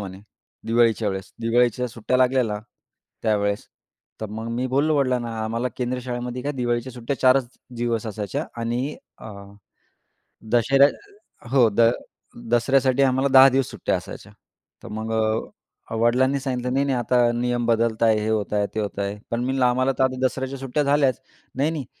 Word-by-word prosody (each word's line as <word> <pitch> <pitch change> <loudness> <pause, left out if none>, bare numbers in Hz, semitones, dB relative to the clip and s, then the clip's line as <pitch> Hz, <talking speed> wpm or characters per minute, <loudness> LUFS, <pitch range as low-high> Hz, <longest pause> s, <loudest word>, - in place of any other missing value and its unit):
म्हणे 95 -1 -7 0.5
दिवाळीच्या 115 -1 +2
वेळेस. 95 -1 -5
दिवाळीच्या 120 +1 +2
सुट्ट्या 115 +2 -1
लागलेल्या, 125 -4 +2 0.6
त्यावेळेस. 100 -2 0 0.5
तर 110 - -3
मग 110 +1 -5
मी 125 +2 -1
बोललो 145 +4 +1
वडिलांना 125 -4 0
आम्हाला 115 +3 -2
केंद्रीय 125 0 -2
शाळेमध्ये 125 0 -4
काय 145 +2 -2
दिवाळीच्या 120 -1 -2
सुट्ट्या 125 +3 -4
4च 130 +1 +6 0.4
दिवस 115 -1 -1
असायच्या 105 -2 -4 0.2
आणि 120 +5 -2 0.2
अ, - - -11 1.3
दशेऱ्या 135 +4 +5 0.6
हो, 130 -4 +5
द 110 +3 +1 0.7
दसऱ्यासाठी 130 +2 +3
आम्हाला 130 +1 +2
10 135 0 +9
दिवस 135 0 0
सुट्ट्या - - -1
असायच्या. - - -10 0.5
तर - - -9
मग 110 +1 -5
अ, 110 0 -3
वडिलांनी 125 +4 +2
सांगितलं 125 -2 -3
नाही, 135 +1 +1
नाही, 135 -2 0
आता 120 0 +2
नियम 120 0 -1
बदलत 115 -1 +1
आहेत. 110 -1 +4
हे 105 +1 -2
होत 105 -2 -1
आहेत. 105 -1 +1
ते - - 0
होत 100 -1 -4
आहेत. 100 +1 -3
पण 115 - -1
मी 120 - -2
म्हटलं 130 -1 +1
आम्हाला 130 +2 +2
तर - - +4
आता 130 -1 0
दसऱ्याच्या 130 +1 -2
सुट्ट्या 135 +2 -1
झाल्याच. 140 -2 +2 0.3
नाही, 145 +4 +1
नाही, 150 -5 -4
120 Hz, 165 wpm, -23 LUFS, 115-130 Hz, 1.3 s, 10